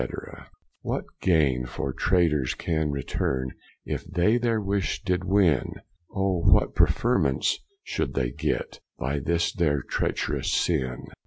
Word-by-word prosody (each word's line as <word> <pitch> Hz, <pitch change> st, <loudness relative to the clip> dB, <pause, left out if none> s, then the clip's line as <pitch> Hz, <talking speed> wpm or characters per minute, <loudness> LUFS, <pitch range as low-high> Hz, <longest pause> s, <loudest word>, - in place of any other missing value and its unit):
What -, -, -2 dB, 0.2 s
gaine 70 Hz, -8 st, +2 dB
for 65 Hz, +2 st, -4 dB
traitors 85 Hz, -8 st, +2 dB
can 80 Hz, -2 st, -1 dB
returne, 65 Hz, -2 st, -2 dB, 0.3 s
If -, -, -3 dB
they 95 Hz, +7 st, +2 dB
their 115 Hz, -2 st, +1 dB
wish 100 Hz, -2 st, -1 dB
did 90 Hz, 0 st, 0 dB
win? 95 Hz, -6 st, +2 dB, 0.4 s
Or 95 Hz, -3 st, 0 dB
what -, -, +4 dB
preferment 65 Hz, -1 st, +2 dB, 0.4 s
should 70 Hz, -, -2 dB
they 60 Hz, -3 st, 0 dB
get, -, -, -2 dB, 0.2 s
By 70 Hz, +3 st, -1 dB
this 85 Hz, +4 st, 0 dB
their 75 Hz, -6 st, +1 dB
trecherous -, -, -1 dB
sinne? 65 Hz, -7 st, 0 dB
80 Hz, 120 wpm, -26 LUFS, 65-95 Hz, 0.4 s, what